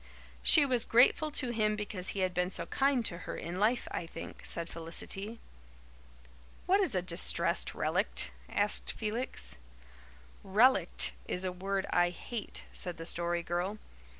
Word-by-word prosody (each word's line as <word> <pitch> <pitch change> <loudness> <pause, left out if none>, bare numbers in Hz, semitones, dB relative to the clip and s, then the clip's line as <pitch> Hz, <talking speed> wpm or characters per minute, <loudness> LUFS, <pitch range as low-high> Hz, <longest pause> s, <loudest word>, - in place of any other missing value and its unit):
"She 300 -3 +6
was 250 -4 +2
grateful 255 +6 +4
to 260 -4 -2
him 215 -2 +1
because 205 -3 -5
he 195 - -3
had 185 -1 0
been 180 +1 0
so 170 - -4
kind 270 +2 +1
to 170 - 0
her - - -6
in 175 +2 -5
life, 230 +4 +1
I 165 - -4
think," - - -9
said 170 0 0
Felicity. 195 +7 -6 1.3
"What 390 +3 +3
is 365 - +1
a 180 - 0
'distressed 175 -1 +3
relict'?" - - 0 0.2
asked 205 +1 +2
Felix. 225 - -1 0.9
"'Relict' 225 +7 +4 0.2
is 180 +1 -2
a 185 - -1
word 195 +2 -2
I 175 0 +3
hate," 215 +5 -6
said 180 -1 -4
the 165 - -7
Story 170 0 0
Girl. 175 +5 -2
195 Hz, 150 wpm, -31 LUFS, 175-235 Hz, 1.3 s, She